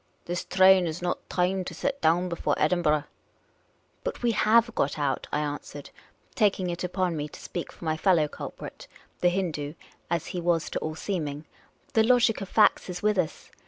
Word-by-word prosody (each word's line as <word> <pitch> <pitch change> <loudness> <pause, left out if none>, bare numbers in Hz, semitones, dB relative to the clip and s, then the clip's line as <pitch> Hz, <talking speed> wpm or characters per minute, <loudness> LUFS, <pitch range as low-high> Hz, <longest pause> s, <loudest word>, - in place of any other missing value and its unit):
" - - -41
This 175 +1 -3
train 190 -1 +5
is 160 +1 -4
not 175 - -3
timed 185 +1 0
to - - -6
set 280 0 -2
down 175 +3 +3
before 165 -4 -1
Edin 175 +3 +2
burgh." 150 -2 +2 0.6
" - - -9
We 240 - +3
have 230 +2 +4
got 145 - 0
out," 140 -3 -1
I 150 - 0
answered, 145 -1 -6 0.4
taking 195 -6 +2
it 170 - -5
upon 180 -1 -1
me 150 -1 -3
to - - -12
speak 175 - -5
for - - -11
my 155 0 0
fellow 165 -3 +3
culprit, - - -8 0.3
the 175 - +4
Hindoo 160 -5 -2 0.2
— - - -31
as 170 -1 -1
he 180 - -2
was 170 -1 +1
to - - -1
all 155 0 -4
seeming. 155 -5 -3 0.2
" - - -35
The 220 - +5
logic 235 -2 +3
of 195 - -6
facts 215 -3 +4
is 180 +1 -5
with 210 -2 +2
us. 165 -4 -3
175 Hz, 200 wpm, -27 LUFS, 155-195 Hz, 0.6 s, train